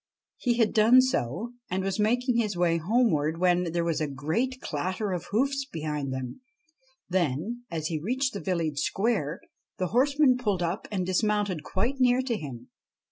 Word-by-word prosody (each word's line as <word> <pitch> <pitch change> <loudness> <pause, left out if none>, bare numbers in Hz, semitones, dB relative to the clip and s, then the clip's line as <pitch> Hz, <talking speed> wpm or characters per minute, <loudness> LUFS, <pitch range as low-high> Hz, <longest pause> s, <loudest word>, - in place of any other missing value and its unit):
He 240 -2 0
had 225 -3 +2
done 225 +4 +7
so, 235 - 0 0.2
and 185 +1 -1
was 195 +2 -2
making 245 +3 +2
his 210 -5 0
way 170 -1 +2
homeward, 165 -5 +1
when 180 -1 +2
there 170 0 0
was 165 -2 -1
a 155 - 0
great 160 - -2
clatter 185 - -2
of 180 -2 -3
hoofs 275 +5 +1
behind 150 -3 -3
him; 130 - -5 0.7
then, 185 - -1
as 160 -2 -4
he 160 -2 -2
reached 260 - -1
the 200 - -4
village 165 -7 -1
square, 195 -7 0 0.4
the 185 -2 -1
horseman 275 +1 +4
pulled 205 -7 0
up 170 +5 -2
and 190 -3 -1
dismounted 200 -2 0
quite 230 - -2
near 250 0 +4
to 250 -3 -1
him. 130 - -8
190 Hz, 170 wpm, -27 LUFS, 160-240 Hz, 0.7 s, done